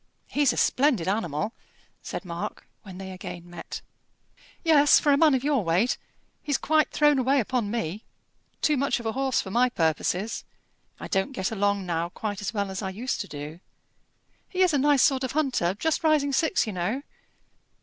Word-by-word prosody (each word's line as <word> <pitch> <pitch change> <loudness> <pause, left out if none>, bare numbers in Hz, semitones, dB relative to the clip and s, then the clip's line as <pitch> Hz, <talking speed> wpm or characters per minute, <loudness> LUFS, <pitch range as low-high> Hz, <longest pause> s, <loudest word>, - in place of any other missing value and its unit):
"He's 285 -3 +2
a - - -5
splendid 255 - +2
animal," 200 0 -1 0.5
said - - -6
Mark, 175 +4 -6
when 190 -4 -11
they 190 0 -7
again 175 -1 -8
met. 175 - -8 0.8
"Yes, 300 -3 +6
for 290 - +2
a - - +6
man 305 -2 +5
of 260 - -1
your 280 -6 +2
weight. 180 +8 +1 0.4
He's 290 -2 0
thrown 300 -2 +3
away 270 +2 +3
upon 240 -2 -1
me; 210 -3 -3 0.6
too 300 -2 +3
much 275 0 +1
of 235 - -9
a 225 - 0
horse 265 +1 0
for 190 - -8
my 245 +4 +3
purposes. 175 +3 -1 0.6
I - - -6
don't 195 +7 -1
get 190 -5 -2
along 200 -2 0
now 170 -1 -1
quite 205 +2 -5
as 195 -1 -2
well 200 -3 -2
as 190 - -4
I 190 - -3
used 230 +7 -3
to 200 - -6
do. 150 +2 -8 0.9
He 370 - -2
is 360 -3 +3
a 285 - +3
nice 285 -1 +4
sort 270 -2 +3
of 260 - -3
hunter; 260 - +1
just 320 +10 -1
rising 300 -3 +3
six, 320 +3 +2
you 215 - -4
know." 195 +10 -2
225 Hz, 185 wpm, -26 LUFS, 190-280 Hz, 0.9 s, Yes